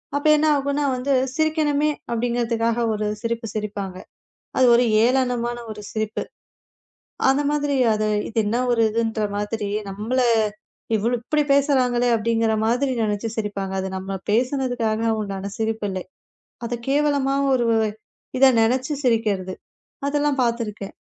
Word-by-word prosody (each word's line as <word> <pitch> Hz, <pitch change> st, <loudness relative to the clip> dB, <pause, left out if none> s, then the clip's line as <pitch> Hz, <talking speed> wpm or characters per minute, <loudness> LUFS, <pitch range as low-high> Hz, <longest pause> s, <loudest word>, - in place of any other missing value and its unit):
அப்போ 285 Hz, +2 st, 0 dB
என்ன 305 Hz, +1 st, +2 dB
ஆகும் 280 Hz, 0 st, -1 dB
என்றால் 280 Hz, -2 st, +1 dB
வந்து 260 Hz, +2 st, 0 dB, 0.2 s
சிரிக்கவேண்டுமே 305 Hz, -2 st, +1 dB, 0.2 s
அப்படி 235 Hz, +1 st, 0 dB
என்கிறதுக்காக 230 Hz, -1 st, 0 dB
ஒரு 210 Hz, 0 st, -2 dB, 0.2 s
சிரிப்பு 230 Hz, 0 st, -3 dB
சிரிப்பாங்க. 200 Hz, -3 st, -4 dB, 0.6 s
அது 260 Hz, -, +5 dB
ஒரு 245 Hz, -, +4 dB, 0.2 s
ஏளனமான 245 Hz, -1 st, +1 dB, 0.2 s
ஒரு 210 Hz, -1 st, -9 dB
சிரிப்பு. 215 Hz, 0 st, -2 dB, 1.1 s
அந்த 270 Hz, +2 st, +3 dB
மாதிரி 290 Hz, -1 st, 0 dB, 0.2 s
அது 215 Hz, 0 st, 0 dB, 0.2 s
இது 225 Hz, -, -4 dB, 0.7 s
என்ற 225 Hz, -1 st, -2 dB, 0.2 s
மாதிரி 210 Hz, 0 st, -2 dB, 0.2 s
நம்மளை 235 Hz, +6 st, 0 dB, 0.7 s
இவ்வளவு 235 Hz, +3 st, 0 dB
இப்படி 300 Hz, +5 st, +1 dB
பேசுறாங்களே 255 Hz, -4 st, +2 dB
அப்படி 230 Hz, +1 st, 0 dB
என்கிற 225 Hz, -1 st, +2 dB
மாதிரி 255 Hz, +4 st, +1 dB
நினைச்சு 210 Hz, +1 st, -1 dB
சிரிப்பாங்க. 205 Hz, -3 st, -3 dB
அது 190 Hz, -, -3 dB
நாம 190 Hz, 0 st, -4 dB
பேசினதுக்காக 235 Hz, -2 st, 0 dB
உண்டான 200 Hz, -1 st, -4 dB
சிரிப்பு 220 Hz, -1 st, -1 dB
இல்லை. 185 Hz, -1 st, -4 dB, 0.6 s
அதைக் 235 Hz, 0 st, -5 dB
கேவலமாக 280 Hz, -1 st, +2 dB
ஒரு 240 Hz, -, +1 dB, 0.7 s
இதை 270 Hz, 0 st, +8 dB
நினைச்சு 255 Hz, +6 st, +1 dB
சிரிக்கிறது. 210 Hz, -6 st, 0 dB, 0.5 s
அதெல்லாம் 290 Hz, -1 st, 0 dB
பார்த்திருக்கேன். 225 Hz, -4 st, -3 dB
235 Hz, 130 wpm, -22 LUFS, 215-270 Hz, 1.1 s, இதை